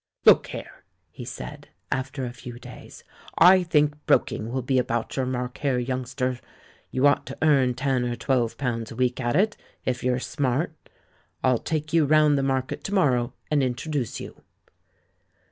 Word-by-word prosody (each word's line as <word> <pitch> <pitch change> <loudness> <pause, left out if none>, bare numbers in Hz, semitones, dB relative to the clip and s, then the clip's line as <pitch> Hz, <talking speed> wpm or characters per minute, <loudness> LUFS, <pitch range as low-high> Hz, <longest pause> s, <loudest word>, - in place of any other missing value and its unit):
"Look - - +7
here," - - -9 0.3
he - - -9
said, - - -8 0.2
after 130 +1 -2
a 120 - -6
few 120 -1 -9
days, - - -12 0.3
"I 185 +1 +7
think 150 -3 +1
broking 110 +2 +1
will 130 0 -2
be 130 +1 +2
about 120 -2 -2
your 130 -2 0
mark 125 -1 -3
here, 140 -3 +1
youngster. 130 0 -2 0.5
You 130 +2 +1
ought 145 - +3
to - - -7
earn 135 -5 +4
ten 130 -1 0
or 120 0 -2
twelve 120 -3 0
pounds 115 -4 -2
a - - -8
week 125 0 0
at 120 0 0
it, 210 +3 +2 0.3
if 125 -1 -1
you're 125 0 +1
smart. 135 +4 -1 0.7
I'll 130 -3 +3
take 155 0 -3
you 165 -2 +4
round 150 0 +4
the 140 - +1
Market 135 -1 -1
to 200 - -3
morrow 130 -8 +2 0.2
and 150 -2 +3
introduce 130 +1 -2
you." - - -10
130 Hz, 170 wpm, -25 LUFS, 125-145 Hz, 0.7 s, Look